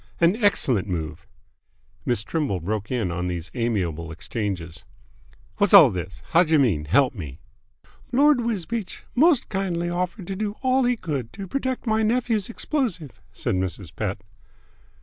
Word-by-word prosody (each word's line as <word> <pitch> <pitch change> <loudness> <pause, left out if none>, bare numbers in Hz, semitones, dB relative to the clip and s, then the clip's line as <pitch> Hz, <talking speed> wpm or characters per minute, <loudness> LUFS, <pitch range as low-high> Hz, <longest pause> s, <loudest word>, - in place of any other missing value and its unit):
"An 170 +3 +4
excellent 125 - +2
move." 80 -5 -4 0.8
Miss 120 -4 +1
Trimble 140 - -1
broke 105 +4 -3
in 115 -8 -1
on 90 +1 -2
these 85 -1 -4
amiable 90 - -1
exchanges. 90 -1 -4 0.8
"Whassall 200 - +8
this? 90 0 -6
Howjer 165 -2 +5
mean 100 - +2
help 130 - +3
me?" 75 - -8 0.7
"Lord 280 +1 +5
Wisbeach 225 -2 -3
most 300 0 +4
kindly 175 -3 -2
offered 180 +2 -3
to 195 - -4
do 210 +1 -3
all 260 0 +3
he 245 0 +2
could 140 - -4
to 195 -1 -7
protect 260 +2 -2
my 220 -1 +2
nephew's 225 -2 +1
explosive," 230 - -2
said - - -2
Mrs. 90 -2 -3
Pett. 95 0 -3
150 Hz, 140 wpm, -24 LUFS, -, 0.8 s, Whassall